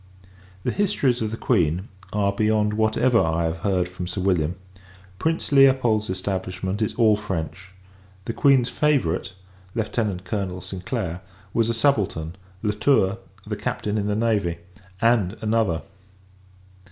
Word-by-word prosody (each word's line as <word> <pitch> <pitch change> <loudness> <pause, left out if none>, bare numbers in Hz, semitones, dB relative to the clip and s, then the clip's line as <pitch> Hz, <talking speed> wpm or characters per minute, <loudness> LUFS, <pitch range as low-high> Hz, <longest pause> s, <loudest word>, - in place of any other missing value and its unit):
The - - 0
histories 145 - +1
of 110 - 0
the 115 - -5
Queen 90 -6 +1 0.2
are 100 -1 +1
beyond 105 0 +2
whatever 110 +3 +3
I 80 +1 +1
have 80 0 -2
heard 90 -1 +1
from 90 0 -6
Sir 90 +2 -4
William. 90 -3 +1 0.6
Prince 160 +4 -1
Leopold's 130 -6 +4
establishment 95 +1 -3
is 110 - -1
all 110 -3 +5
French. 95 -2 -5 0.6
The 115 - -3
Queen's 135 -3 +4
favourite, 95 - +1 0.4
Lieutenant 105 -4 -1
Colonel 95 -4 -3
St. 95 +1 -8
Clair, 95 -8 -2 0.3
was 115 -1 +2
a - - +1
subaltern; 100 - +1 0.3
La 105 - +2
Tour, 105 -2 +2 0.3
the - - -3
Captain 105 0 -3
in 100 - -1
the 105 - 0
navy; 105 -7 +1 0.4
and, 115 -4 +2
another! 110 -6 +1
105 Hz, 140 wpm, -24 LUFS, 90-115 Hz, 0.6 s, all